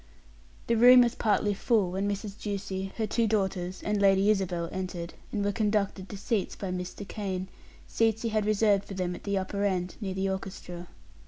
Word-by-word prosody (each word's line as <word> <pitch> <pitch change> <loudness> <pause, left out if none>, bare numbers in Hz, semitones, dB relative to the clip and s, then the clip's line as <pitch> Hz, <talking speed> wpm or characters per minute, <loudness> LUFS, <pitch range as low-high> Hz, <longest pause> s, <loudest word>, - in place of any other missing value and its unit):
The 235 - +2
room 250 +2 +9
was 240 -1 +3
partly 210 -3 +1
full 200 -2 +1
when 195 +2 -1
Mrs. 200 0 -4
Ducie, 195 -2 -3
her 225 - 0
two 225 +2 +1
daughters, 190 -3 -1
and 210 -1 0
Lady 195 +1 +5
Isabel 180 -4 -1
entered, 180 -2 -5 0.2
and 205 -2 -1
were 205 - +2
conducted 205 -3 0
to 200 - -6
seats 205 0 -1
by 195 -2 -4
Mr. 180 +2 -5
Kane 190 -3 -4 0.4
seats 225 -1 +1
he 230 - 0
had 215 -1 0
reserved 210 -2 +3
for 195 - -8
them 180 -1 -1
at - - -10
the 200 -1 0
upper 200 +1 -2
end, 185 -2 -1
near 190 -2 -3
the 190 0 0
orchestra. 185 -2 -5
200 Hz, 190 wpm, -28 LUFS, 190-210 Hz, 0.4 s, room